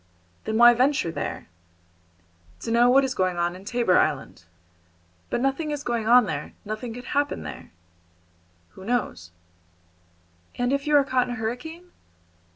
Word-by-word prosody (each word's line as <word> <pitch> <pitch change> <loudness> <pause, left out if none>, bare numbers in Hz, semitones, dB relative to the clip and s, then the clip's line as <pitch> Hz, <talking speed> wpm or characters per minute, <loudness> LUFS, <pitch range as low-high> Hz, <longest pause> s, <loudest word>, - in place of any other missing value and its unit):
"Then 220 - -1
why 240 +1 +8
venture 255 - +1
there?" 145 - -5 1.1
"To 230 - -4
know 240 +1 +5
what 270 +2 +5
is 265 -1 -1
going 185 -5 0
on 175 +1 -1
in 185 - -12
Tabor 235 -5 +2
Island." 140 - -2 0.8
"But 240 - -1
nothing 270 +4 -1
is 295 -1 -4
going 235 -3 -2
on 245 0 +6
there; 150 -5 -5
nothing 215 +3 -5
could 245 - -9
happen 285 0 0
there." - - -9 1.0
"Who 190 - -14
knows?" 190 - -2 1.3
"And 245 +2 0
if 280 +1 -2
you 300 - +3
are 285 - +6
caught 255 -2 0
in 245 - -4
a - - -8
hurricane?" 320 +11 -6
240 Hz, 160 wpm, -25 LUFS, 200-270 Hz, 1.3 s, why